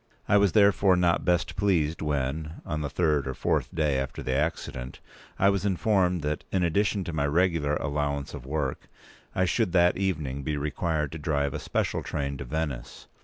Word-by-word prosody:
I - - +4
was 100 -3 +3
therefore 100 -2 +5
not 90 -1 +2
best 90 -1 +1
pleased 85 -6 +1
when, 75 +1 -2
on 80 -2 -3
the 70 - -2
third 75 -2 +1
or 65 - -3
fourth - - 0
day 75 -4 +1
after 65 -1 -4
the 65 - -1
accident, 70 -4 -2 0.4
I 100 - +4
was 100 -2 0
informed 95 -3 +1
that, 75 +1 -2
in 95 -2 +1
addition 100 +4 +1
to 85 - -5
my 70 -2 0
regular 80 -2 +2
allowance 70 0 -2
of - - -7
work, 70 -1 -3 0.5
I 95 - +3
should 90 +1 0
that 90 -1 +4
evening 75 -8 -2
be 75 +1 -2
required 75 0 -1
to 80 - -6
drive 70 -2 0
a - - -3
special - - -1
train 70 -1 -3
to 70 - -6
Venice. 70 -3 -4
80 Hz, 185 wpm, -27 LUFS, 70-90 Hz, 0.5 s, therefore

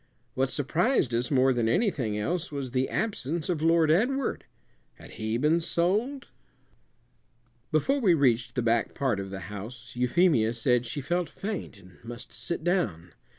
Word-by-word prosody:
What 130 0 0
surprised 155 - +1
us 120 +1 0
more 130 -1 +4
than 120 -2 +1
anything 125 - 0
else 170 - -2
was 140 -3 -4
the 130 +1 0
absence 170 - -2
of 165 -4 -1
Lord 165 -1 +4
Edward. 250 - +1 0.5
Had - - -14
he 110 0 -2
been 150 +6 +3
sold? 205 +12 0 1.4
Before 215 - +2
we 190 -9 +4
reached 120 -4 +2
the 125 - 0
back 115 0 +1
part 130 -7 0
of 95 0 -5
the 95 -1 -6
house 110 +6 -8
Euphemia 125 -2 +3
said 120 +1 +1
she 145 +5 -4
felt 175 +3 -1
faint 200 - -5
and 90 0 -18
must 120 +1 -8
sit 170 -2 -5
down. 105 - -1
135 Hz, 155 wpm, -27 LUFS, 115-175 Hz, 1.4 s, more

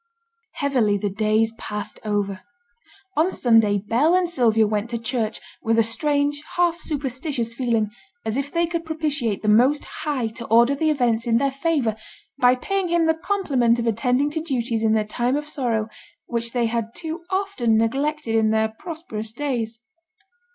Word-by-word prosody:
Heavily 250 -8 +1
the 200 0 -2
days 215 +2 +1
passed 210 0 -6
over. 200 -3 -1 0.7
On 320 +4 +3
Sunday 225 - +3
Bell 240 - +2
and 365 -1 +2
Sylvia 230 -9 +3
went 210 +1 -1
to 235 - -2
church, 225 -1 -2 0.2
with 225 0 +1
a 230 - +5
strange, 290 +5 0
half 345 -1 +2
superstitious 265 -4 -2
feeling, 230 -4 0 0.3
as 220 0 -1
if 275 +1 -2
they 340 +2 +1
could 335 0 -3
propitiate 295 -10 -2
the - - -2
Most 250 +8 +4 0.2
High 285 -6 -1
to 230 +1 -7
order 235 +4 +5
the 310 +3 +1
events 240 -5 +1
in 230 -1 +3
their 275 +3 +1
favour 275 -6 0 0.4
by 250 0 +5
paying 390 +8 -1
Him 340 -1 +2
the 320 - +4
compliment 315 - +1
of 235 - -2
attending 250 +5 +1
to 320 +1 -2
duties 240 -7 -1
in 220 -1 +3
their 215 -1 +2
time 240 +4 0
of 295 +1 -3
sorrow 235 -7 -1 0.4
which 235 -1 -1
they 240 -1 +1
had 230 0 -2
too 330 0 -4
often 380 - +1
neglected 275 +3 0
in 220 -1 +3
their 220 0 +2
prosperous 220 -5 -7
days. 235 -3 -3
240 Hz, 170 wpm, -23 LUFS, 225-295 Hz, 0.7 s, a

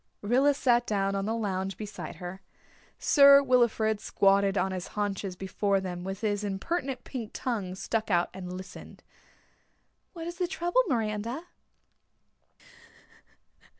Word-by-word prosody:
Rilla 265 +7 +3
sat 240 -3 +2
down 195 -2 0
on 195 0 -1
the 225 - 0
lounge 195 -4 -2
beside 210 -1 -7
her. 180 +1 -8 0.6
Sir 280 -1 +7
Wilfrid 235 -4 +2
squatted 200 -1 +2
on 190 - +1
his 185 -1 -4
haunches 200 -2 -2
before 195 +1 0
them, 180 -2 -5
with 195 +2 -5
his 210 -2 -1
impertinent 255 - -3
pink 235 -5 -6
tongue 205 -8 -3
stuck 220 +3 -2
out, 175 -3 +2
and 180 -1 -7
listened. 185 +1 -10 1.1
"What 330 -3 -7
is 345 0 -6
the 360 - +1
trouble, 350 +5 +1
Miranda?" 230 - -2
210 Hz, 130 wpm, -28 LUFS, 195-250 Hz, 1.1 s, Sir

